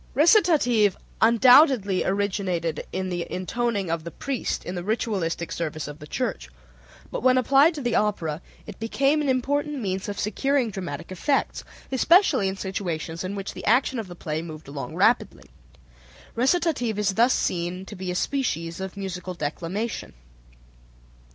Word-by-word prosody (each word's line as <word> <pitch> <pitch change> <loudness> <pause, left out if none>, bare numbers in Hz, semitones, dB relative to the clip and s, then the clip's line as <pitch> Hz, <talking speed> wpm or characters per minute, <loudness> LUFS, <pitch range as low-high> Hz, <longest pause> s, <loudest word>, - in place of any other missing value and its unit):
Recitative 290 - +4 0.2
undoubtedly 235 - +5
originated 190 -5 -1
in 185 0 -3
the 175 -1 -3
intoning 200 0 -1
of 165 -1 -2
the 170 - -6
priest 270 +7 -3
in 180 - -4
the 175 -1 -4
ritualistic 195 -6 -2
service 155 -2 -3
of 145 0 -9
the 150 - -10
Church, - - -3 0.6
but - - -3
when 255 +1 +4
applied 275 +6 +4
to 290 - -5
the 240 -2 0
opera 175 -8 0 0.2
it 210 - -10
became 275 +7 +1
an 290 - 0
important 285 +3 0
means 190 -3 -3
of 200 - -5
securing 250 +3 0
dramatic 180 -6 -6
effects, 275 - -1 0.3
especially 280 - +4
in 190 - -2
situations 170 -4 -4
in 190 +2 -4
which 195 -1 -5
the - - -8
action 245 +2 +3
of 220 - -5
the 175 - -9
play 155 -2 -3
moved 160 -3 -9
along 140 0 -6
rapidly. - - +1 0.8
Recitative 255 - +1
is 205 -2 +1
thus 235 +5 +4
seen 180 +1 -2
to 205 - -9
be 185 -1 -5
a 180 - -2
species 175 - -2
of 190 +1 -6
musical 185 -2 -5
declamation. 175 +8 -4
200 Hz, 155 wpm, -25 LUFS, 175-250 Hz, 0.8 s, undoubtedly